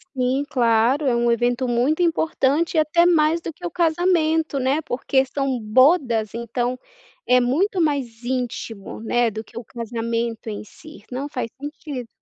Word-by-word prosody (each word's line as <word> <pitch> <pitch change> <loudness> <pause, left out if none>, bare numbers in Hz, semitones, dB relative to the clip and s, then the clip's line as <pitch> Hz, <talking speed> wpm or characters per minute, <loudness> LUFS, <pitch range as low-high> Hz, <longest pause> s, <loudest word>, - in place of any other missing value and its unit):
Sim, 260 +2 +1
claro. 240 +4 +2
É 245 -3 +2
um 235 0 +2
evento 245 +2 +1
muito 255 +8 +1
importante 320 -1 +1
e, - - +6
até 325 +3 +3
mais 330 -1 +3
do 325 - -6
que 355 - -10
o 345 - -3
casamento, 320 -3 +1
né, 270 +5 +1
porque 265 0 0
são 270 -1 -2
bodas, 235 - +3
então 240 +2 -2 0.5
é 250 0 +5
muito 350 +10 +1
mais 260 -7 -1
íntimo, 240 -5 -4
né, 240 +1 +1
do 220 +1 -6
que - - -15
o - - -9
casamento 230 0 -3
em 210 - -5
si, 310 +9 -14
não, 270 +3 -3
faz 245 -4 -4
sentido. 290 -4 -6
255 Hz, 160 wpm, -22 LUFS, 235-310 Hz, 0.5 s, e